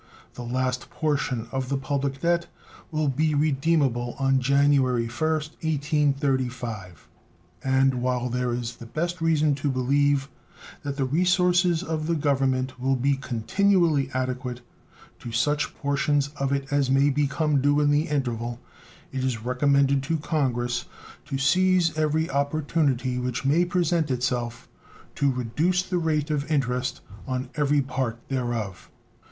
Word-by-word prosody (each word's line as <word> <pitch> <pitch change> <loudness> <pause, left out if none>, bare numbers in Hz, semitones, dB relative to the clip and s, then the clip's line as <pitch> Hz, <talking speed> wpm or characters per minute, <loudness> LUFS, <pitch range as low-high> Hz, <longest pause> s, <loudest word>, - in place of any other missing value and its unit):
The - - -8
last 125 +1 -2
portion 145 -7 -1
of 130 0 -3
the 140 - 0
public 135 0 -2
debt 170 0 +1 0.4
will 155 -2 0
be 150 +3 +1
redeemable 140 -4 +1
on 135 -1 +2
January 135 -2 +3
1st, 155 +5 -2
1835, 135 - -1 0.6
and, 135 0 +3
while 125 -1 0
there 125 0 -1
is 120 0 -4
the 115 - -10
best 170 +6 -3
reason 155 -2 +3
to 140 +1 -2
believe 140 +2 +2 0.5
that 140 -1 -4
the 135 - +1
resources 180 +3 +2
of 160 -3 -3
the 170 - +1
Government 135 -3 0
will 135 +1 +1
be 135 +2 +2
continually 155 - +1
adequate 125 -1 -3 0.6
to 120 - -7
such 145 +6 0
portions 145 0 0
of 140 -2 -3
it 140 +1 -2
as 140 -2 +2
may 135 +2 +4
become 145 +1 +1
due 145 +1 +3
in 145 -1 +3
the 150 +2 +2
interval, 120 -5 -2 0.5
it 130 -1 -3
is 120 -4 -2
recommended 140 +2 +2
to 160 +4 -1
Congress 120 -6 -1 0.4
to 135 - -3
seize 180 +3 +3
every 155 +1 +1
opportunity 140 -3 0
which 125 +1 -3
may 155 +6 +4
present 170 -3 +1
itself 125 -1 -2 0.5
to 140 -1 +1
reduce 150 +9 0
the 180 -1 -1
rate 155 -2 0
of 150 0 -2
interest 125 -3 0 0.3
on 130 0 -3
every 145 -2 +2
part 130 -3 -2
thereof. 120 -7 -3
140 Hz, 140 wpm, -25 LUFS, 125-150 Hz, 0.6 s, may